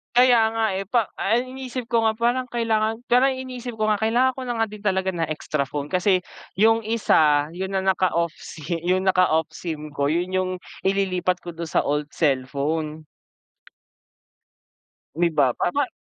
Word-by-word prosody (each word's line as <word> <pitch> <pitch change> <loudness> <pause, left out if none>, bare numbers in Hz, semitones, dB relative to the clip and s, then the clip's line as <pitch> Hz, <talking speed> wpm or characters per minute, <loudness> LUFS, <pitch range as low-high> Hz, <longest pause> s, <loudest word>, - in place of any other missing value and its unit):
Kaya 245 -1 +6
nga, 225 0 +1
eh, 195 - -3
pa 230 -1 +1
ay 240 +5 +1
iniisip 255 -2 -6
ko 230 -1 +3
nga 220 - +2
parang 240 +3 0
kailangan 225 -1 -1
parang 255 +3 +4
iniisip 250 -2 -6
ko 215 -1 0
nga 210 - +1
kailangan 240 +4 +3
ko - - -5
na 240 - -2
nga 225 - +2
din 210 0 -11
talaga 190 -2 +1
na 165 -3 -2
extra 150 -2 -2
phone 145 0 -5
kasi, 185 0 +2 0.3
yung 225 +3 +4
isa, 155 -10 +3
yun 190 +3 -5
na 190 - 0
naka-off 185 -3 +1
sim 160 +2 -5
yung 185 +1 +2
naka-off 180 -4 +2
sim 155 -3 -6
ko 140 -1 -1
yun 175 +4 -1
yung 185 0 0 0.4
ililipat 185 -2 +1
ko 175 - -6
dun 170 0 -6
sa - - +1
old 150 0 -1
cellphone. 150 +2 -1 2.1
May 170 +1 +2
iba 140 -5 +3
pa - - 0
ba 285 -2 +2
190 Hz, 170 wpm, -23 LUFS, 160-230 Hz, 2.1 s, Kaya